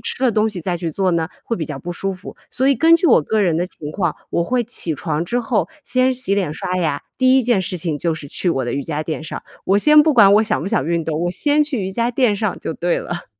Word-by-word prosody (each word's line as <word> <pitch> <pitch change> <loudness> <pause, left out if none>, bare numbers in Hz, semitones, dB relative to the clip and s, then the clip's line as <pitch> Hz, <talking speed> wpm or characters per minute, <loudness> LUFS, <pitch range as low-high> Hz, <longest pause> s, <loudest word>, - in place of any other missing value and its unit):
吃 - - -4
了 245 - +3
东 215 +1 +2
西 200 -4 -5
再 175 +1 -2
去 170 -1 -4
做 185 +4 0
呢， 165 -1 0 0.2
会 230 - -2
比 160 - -3
较 145 -3 -6
不 175 +3 -6
舒 195 +2 -3
服。 185 +1 -10
所 260 - 0
以 275 - +4
根 330 +4 +5
据 340 - 0
我 230 - +5
个 215 +8 0
人 175 -5 +2
的 175 - 0
情 150 -5 -9
况， 175 -1 -1 0.2
我 170 - 0
会 245 +4 0
起 195 -8 -2
床 150 +2 -2
之 235 +8 -1
后， 235 -1 -1 0.2
先 255 0 +2
洗 245 -6 -1
脸 185 -7 -1
刷 180 +4 -3
牙， 155 -5 -1 0.2
第 260 0 +5
1 - - +2
件 235 -4 +2
事 185 0 -3
情 160 -3 -2
就 165 +2 0
是 155 -2 -8
去 180 - -2
我 135 -6 0
的 120 - -3
瑜 140 - -2
伽 155 +1 -3
垫 155 0 -4
上， 160 - -7 0.2
我 195 +2 +3
先 300 +6 +6
不 310 -1 +2
管 205 -5 +7
我 215 - +5
想 215 - 0
不 160 - -5
想 140 - 0
运 170 -1 -1
动， 160 0 -2
我 175 - 0
先 295 - +2
去 290 -6 -3
瑜 190 - -3
伽 235 +4 0
垫 245 -4 +2
上 205 -1 -2
就 - - -4
对 175 +2 -1
了。 175 0 -6
185 Hz, 305 characters per minute, -19 LUFS, 165-240 Hz, 0.2 s, 管